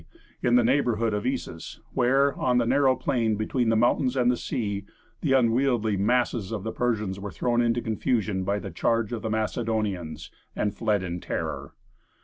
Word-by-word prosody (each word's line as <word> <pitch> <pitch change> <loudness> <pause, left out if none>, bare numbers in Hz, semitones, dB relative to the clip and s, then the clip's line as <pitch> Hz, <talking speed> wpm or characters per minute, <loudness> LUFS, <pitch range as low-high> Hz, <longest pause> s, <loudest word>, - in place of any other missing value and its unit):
in 120 0 +3
the 125 - +5
neighborhood 115 -3 +1
of 105 0 -1
Issus, - - -4
where, 135 +3 +3
on 125 -1 +1
the 120 - +3
narrow 130 +1 +3
plain 115 -7 0
between 110 +3 0
the 115 - +3
mountains 125 +3 +2
and 125 -1 +4
the - - +1
sea, 100 -5 -3 0.4
the 140 -4 +1
unwieldy 120 -3 +2
masses 115 0 +1
of 105 -4 -3
the 110 - -3
Persians 110 -6 -1
were 100 +1 -5
thrown 120 +3 0
into 120 0 +1
confusion 110 -3 0
by 100 +2 0
the - - -6
charge 115 -1 0
of 115 - -3
the 110 - -3
Macedonians, 110 -6 -2 0.2
and 105 -1 -1
fled 105 -3 0
in 90 -1 -4
terror. - - -4
115 Hz, 175 wpm, -26 LUFS, 105-125 Hz, 0.4 s, the